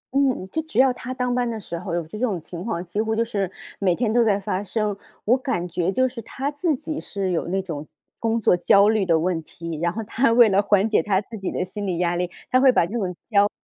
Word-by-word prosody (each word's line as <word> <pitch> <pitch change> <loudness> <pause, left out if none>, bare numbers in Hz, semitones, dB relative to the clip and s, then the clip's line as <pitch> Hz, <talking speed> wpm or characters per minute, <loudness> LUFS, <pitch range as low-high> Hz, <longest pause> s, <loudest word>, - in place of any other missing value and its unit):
嗯， 265 -8 +2
就 320 - -1
只 315 -6 -8
要 260 0 +5
他 250 +1 -7
当 250 -1 -1
班 245 -1 0
的 225 -1 -4
时 170 -4 -6
候 175 -1 -4
有 170 -2 -2
这 190 +7 -8
种 220 -8 0
情 170 +2 -8
况， 185 -5 -3
几 190 +5 -2
乎 220 0 -1
就 230 +1 +1
是 200 -5 -2 0.3
每 185 -3 +2
天 225 0 0
都 240 0 +5
在 205 -3 +2
发 190 0 -2
生。 210 0 -1 0.3
我 235 - +5
感 255 -10 -2
觉 175 +1 -1
就 260 +5 +2
是， 245 -2 -7
他 270 +6 -4
自 300 +1 0
己 305 +2 -5
是 195 -2 -3
有 170 - -1
那 190 +2 0
种 155 -5 -6 0.3
工 230 0 +1
作 200 - +4
焦 200 +3 +5
虑 215 -4 +1
的 165 -2 +4
问 170 0 0
题， 165 +1 -7
然 170 0 +1
后 225 +5 -4
他 230 +3 +1
为 230 -1 +7
了 195 0 +4
缓 205 0 +3
解 220 - +3
他 195 -2 +1
自 220 +3 -9
己 190 - -3
的 180 - -2
心 205 +2 -5
理 180 -3 -1
压 175 0 +1
力， 175 0 -1 0.2
他 255 - +4
会 265 -1 +7
把 200 - +3
这 185 - -8
种 190 -6 -2
焦 205 -2 +3
205 Hz, 285 characters per minute, -23 LUFS, 180-240 Hz, 0.3 s, 为